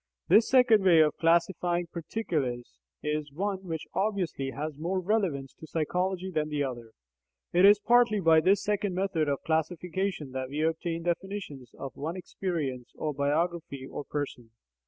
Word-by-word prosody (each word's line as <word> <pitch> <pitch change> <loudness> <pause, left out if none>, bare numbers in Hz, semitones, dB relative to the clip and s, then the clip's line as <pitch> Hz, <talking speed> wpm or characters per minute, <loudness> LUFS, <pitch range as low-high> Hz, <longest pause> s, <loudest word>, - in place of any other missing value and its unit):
This 210 +6 +6
second 245 -6 +5
way 175 -4 +6
of 155 -1 +3
classifying 170 +1 +2
particulars 160 - -3 0.2
is 150 -1 -2
one 195 +5 -2
which 160 -2 -4
obviously 190 -10 -1
has 150 +2 -5
more 180 +4 -1
relevance 180 -9 -1
to 160 - -12
psychology 180 +4 -1
than 155 -2 -1
the 145 -1 0
other. 120 -4 -6 0.6
It 180 +2 +6
is 205 +1 +8
partly 235 0 +4
by 165 -3 +5
this 195 +4 +3
second 205 -2 -1
method 180 -5 0
of 140 - -2
classification 165 0 -2
that 130 0 -4
we 150 +3 -2
obtain 165 +1 -1
definitions 175 - -4
of 135 - -7
one 160 +5 -4
"experience" 155 -10 -4
or 155 -1 -2
"biography" 145 0 -1
or 145 - -6
"person." 140 -6 -5
165 Hz, 155 wpm, -28 LUFS, 145-190 Hz, 0.6 s, is